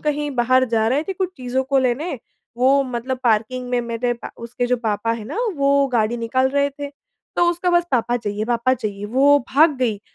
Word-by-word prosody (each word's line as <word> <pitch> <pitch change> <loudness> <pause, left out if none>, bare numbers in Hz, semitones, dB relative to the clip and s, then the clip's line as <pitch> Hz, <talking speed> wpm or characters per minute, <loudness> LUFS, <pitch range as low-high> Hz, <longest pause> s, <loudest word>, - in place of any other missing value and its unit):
कहीं 295 -1 -1
बाहर 255 +2 +3
जा 220 -1 +1
रहे 270 +5 +1
थे 385 - -3
कुछ 370 -1 -2
चीज़ों 255 +1 -2
को 270 +1 +1
लेने, 265 +3 -1 0.4
वो 270 +3 +4
मतलब 255 0 -4
पार्किंग 240 +3 0
में 245 -1 +1
मेरे 235 +1 -2
प - - -6
उसके 240 +1 -3
जो 250 0 +1
पापा 230 -1 -1
है 225 -2 -5
ना 230 - -7 0.2
वो 280 0 +3
गाड़ी 235 -2 0
निकाल 260 +3 0
रहे 280 +1 +1
थे। 285 +1 -7 0.5
तो 350 - +4
उसका 350 +1 -1
बस 345 0 +3
पापा 240 -2 +1
चाहिए, 210 -2 -3
पापा 240 +2 +1
चाहिए 205 -3 -5
वो 275 +5 +4 0.2
भाग 305 0 +5
गई, 225 -6 -1
255 Hz, 205 wpm, -21 LUFS, 230-280 Hz, 0.5 s, भाग